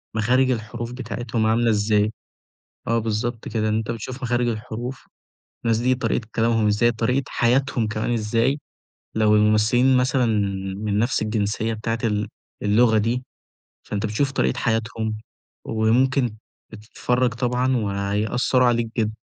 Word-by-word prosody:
مخارج 125 +4 +3
الحروف 115 0 -4
بتاعتهم 120 -3 -3
عاملة 115 +2 +2
إزاي، 105 0 +2 0.8
آه 115 +1 +2
بالضبط 115 +1 -2
كده، 110 -1 -1
إن 105 - +1
أنت 110 0 -2
بتشوف 125 +3 -6
مخارج 120 -1 +1
الحروف 115 +3 -5 0.6
الناس 115 -1 +2
دي 125 +2 +2
طريقة 120 -2 -2
كلامهم 115 -1 +2
إزاي 110 +3 +3
طريقة 125 +4 0
حياتهم 125 -1 +1
كمان 110 +2 -2
إزاي، 115 +5 +1 0.6
لو 110 -1 +3
الممثلين 110 +5 +4
مثلًا 125 0 +2 0.5
من 105 0 -1
نَفْس 120 +2 +1
الجنسية 110 +1 -1
بتاعة 115 +1 -2
ال 105 -1 0 0.3
اللغة 110 +2 +4
دي 120 +4 0 0.6
فأنت 105 +1 -3
بتشوف 135 +6 0
طريقة - - 0
حياتهم 110 -1 -1 0.5
وممكن 120 +2 +1 0.3
بتتفرّج 120 +3 -1
طبعًا 125 +1 0
وهيأثّروا 105 +5 +1
عليك 120 -1 +1
جدًا. 110 -1 0
115 Hz, 130 wpm, -23 LUFS, 110-125 Hz, 0.8 s, الممثلين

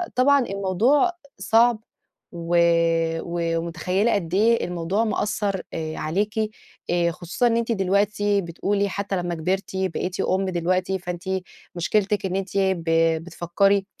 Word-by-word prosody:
طبعًا 280 +3 +5
الموضوع 200 - +2 0.3
صعب، 225 +3 +3 0.5
و 170 0 -1 1.0
ومتخيّلة 180 +6 0
قد 175 -4 -2
إيه 225 +4 +3
الموضوع 180 +5 -1
مأثّر 205 -2 -1
آآ 160 -1 -4
عليكِ، 200 +7 -1 0.6
آآ 170 -1 +2
خصوصًا 175 +8 -1
إن 230 -1 +2
أنتِ 235 0 -1
دلوقتي 200 +1 +1
بتقولي 200 +4 -1
حتّى 200 0 -3
لمّا 175 -1 -2
كبرتِ 185 +4 -2
بقيتِ 185 0 -2
أُم 190 +1 +1
دلوقتي 185 +1 0
فأنتِ 180 -1 -6 0.5
مشكلتِك 200 +4 0
إن 185 -1 -2
أنتِ 195 0 -3
ب 190 -3 +1 0.4
بتفكّري، 185 +3 +1
190 Hz, 125 wpm, -23 LUFS, 175-205 Hz, 1.0 s, طبعًا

